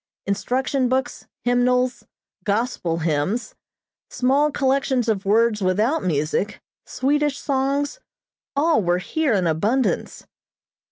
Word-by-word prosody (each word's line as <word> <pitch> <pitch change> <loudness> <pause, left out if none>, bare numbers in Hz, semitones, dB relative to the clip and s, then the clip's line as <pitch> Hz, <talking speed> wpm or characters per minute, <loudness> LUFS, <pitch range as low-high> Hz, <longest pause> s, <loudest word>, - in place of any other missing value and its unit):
Instruction 250 +6 0
books, 260 -1 -2 0.2
hymnals, 250 +1 +1 0.4
"Gospel 205 -6 -1
Hymns," 180 +9 -1 0.6
small 275 +4 +2
collections 265 -3 +1
of 205 -3 0
words 220 +1 +3
without 215 - +1
music, 160 +5 -1 0.3
Swedish 290 +1 0
songs 280 - -1 0.6
all 305 -2 +3
were 175 -1 +1
here 290 +8 0
in 190 -3 +1
abundance. 205 +11 0
245 Hz, 100 wpm, -22 LUFS, 200-270 Hz, 0.6 s, words